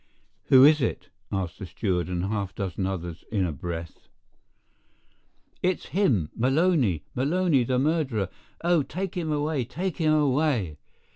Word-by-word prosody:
"Who 130 Hz, -1 st, +7 dB
is 150 Hz, 0 st, +6 dB
it?" -, -, -2 dB, 0.2 s
asked 95 Hz, -3 st, -3 dB
the 95 Hz, -, -6 dB
steward 95 Hz, -1 st, -1 dB
and 90 Hz, 0 st, -1 dB
half 100 Hz, -2 st, -2 dB
a -, -, -44 dB
dozen 95 Hz, -1 st, -2 dB
others 85 Hz, -3 st, -5 dB
in 100 Hz, -4 st, +1 dB
a 85 Hz, -, -1 dB
breath. 85 Hz, +1 st, -7 dB, 1.5 s
"It's 185 Hz, 0 st, -1 dB
him—Maloney—Maloney, 135 Hz, -, +1 dB
the 125 Hz, +1 st, 0 dB
murderer—oh, 150 Hz, -, 0 dB
take 185 Hz, +6 st, -4 dB
him 165 Hz, -3 st, -2 dB
away—take 150 Hz, +3 st, -2 dB
him 155 Hz, -2 st, +2 dB
away!" 135 Hz, -, +1 dB
125 Hz, 125 wpm, -26 LUFS, 95-155 Hz, 1.5 s, Who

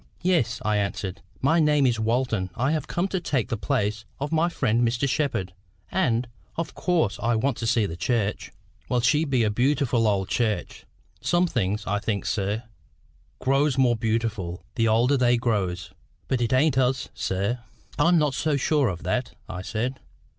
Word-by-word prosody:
"Yes," 160 Hz, -11 st, +2 dB
I 105 Hz, -1 st, +2 dB
answered. 100 Hz, -2 st, -3 dB, 0.2 s
"My 160 Hz, +5 st, +4 dB
name 150 Hz, -3 st, +4 dB
is 120 Hz, -3 st, +2 dB
Walton 115 Hz, -4 st, 0 dB
I 130 Hz, +5 st, +1 dB
have 155 Hz, -1 st, -1 dB
come 175 Hz, +2 st, -1 dB
to 190 Hz, -, -1 dB
take 130 Hz, -8 st, -1 dB
the 120 Hz, -, 0 dB
place 105 Hz, +2 st, -1 dB, 0.2 s
of 145 Hz, +2 st, -3 dB
my 165 Hz, +2 st, +2 dB
friend 120 Hz, -8 st, +1 dB
Mr. 120 Hz, +3 st, +1 dB
Shepherd; 115 Hz, -, -1 dB, 0.4 s
and, 125 Hz, -10 st, +1 dB, 0.3 s
of 165 Hz, -, -3 dB
course, 170 Hz, -, 0 dB
I 120 Hz, +1 st, +2 dB
want 130 Hz, +5 st, +1 dB
to 115 Hz, -, -3 dB
see 115 Hz, -2 st, +3 dB
the 80 Hz, -, -4 dB
church." 105 Hz, +1 st, -1 dB, 0.4 s
"Well, 125 Hz, -1 st, +2 dB
she 150 Hz, +7 st, +3 dB
be 130 Hz, -5 st, +2 dB
a 105 Hz, -, +2 dB
bee 105 Hz, -, -2 dB
utiful 120 Hz, -4 st, +1 dB
old 95 Hz, -3 st, +1 dB
church. 110 Hz, -6 st, -2 dB, 0.3 s
Some 175 Hz, +1 st, +2 dB
things, 105 Hz, -, -1 dB
I 105 Hz, +1 st, 0 dB
think, 100 Hz, -3 st, -2 dB
sir, 105 Hz, +2 st, -1 dB, 0.7 s
grows 135 Hz, +1 st, +2 dB
more 125 Hz, -3 st, +4 dB
beautiful 110 Hz, -6 st, -2 dB
the 115 Hz, -2 st, +1 dB
older 120 Hz, +5 st, +3 dB
they 120 Hz, -1 st, +3 dB
grows. 95 Hz, -8 st, -1 dB, 0.4 s
But 130 Hz, -2 st, 0 dB
it 115 Hz, -, 0 dB
ain't 135 Hz, +1 st, +3 dB
us, 130 Hz, 0 st, +1 dB
sir." 100 Hz, +6 st, -1 dB, 0.4 s
"I'm 175 Hz, 0 st, +5 dB
not 150 Hz, -3 st, +2 dB
so 150 Hz, +1 st, 0 dB
sure 145 Hz, 0 st, +2 dB
of 90 Hz, -4 st, -4 dB
that," 120 Hz, +8 st, -2 dB
I 90 Hz, -, -5 dB
said. 120 Hz, +7 st, -3 dB
120 Hz, 180 wpm, -25 LUFS, 105-140 Hz, 0.7 s, I'm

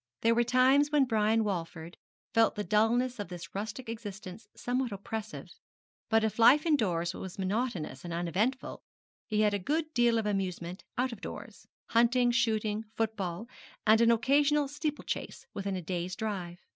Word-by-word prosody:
There 230 Hz, +1 st, +4 dB
were 240 Hz, +1 st, +3 dB
times 260 Hz, +4 st, +4 dB
when 290 Hz, -2 st, +4 dB
Brian 220 Hz, -1 st, +2 dB
Walford 170 Hz, -4 st, -4 dB, 0.4 s
felt 225 Hz, 0 st, +4 dB
the 210 Hz, -, -2 dB
dulness 230 Hz, +4 st, +2 dB
of 205 Hz, -, -4 dB
this 175 Hz, 0 st, -9 dB
rustic 220 Hz, +5 st, -5 dB
existence 210 Hz, -2 st, -8 dB
somewhat 250 Hz, 0 st, -2 dB
oppressive; 215 Hz, +2 st, -6 dB, 0.6 s
but 225 Hz, -1 st, +3 dB
if 220 Hz, +1 st, -1 dB
life 275 Hz, +7 st, +6 dB
indoors 185 Hz, -, +1 dB
was 185 Hz, -1 st, -8 dB
monotonous 195 Hz, -, -2 dB
and 175 Hz, -, -6 dB
uneventful, 185 Hz, -, -1 dB, 0.5 s
he 215 Hz, -1 st, +1 dB
had 210 Hz, -1 st, +3 dB
a 205 Hz, -, 0 dB
good 310 Hz, -, -2 dB
deal 240 Hz, -1 st, +3 dB
of 225 Hz, -, -1 dB
amusement 185 Hz, -3 st, -3 dB
out 255 Hz, +1 st, +1 dB
of 225 Hz, -3 st, -9 dB
doors -, -, -9 dB, 0.2 s
hunting, 240 Hz, +1 st, +3 dB
shooting, 220 Hz, -2 st, 0 dB
football, 215 Hz, -3 st, -2 dB, 0.4 s
and 220 Hz, +1 st, +5 dB
an 230 Hz, -, +5 dB
occasional 285 Hz, +5 st, +3 dB
steeple 295 Hz, +1 st, -3 dB
chase -, -, -5 dB
within 200 Hz, -1 st, -3 dB
a 180 Hz, -, -4 dB
day's 180 Hz, +1 st, -3 dB
drive. 185 Hz, -5 st, -4 dB
220 Hz, 160 wpm, -30 LUFS, 190-245 Hz, 0.6 s, life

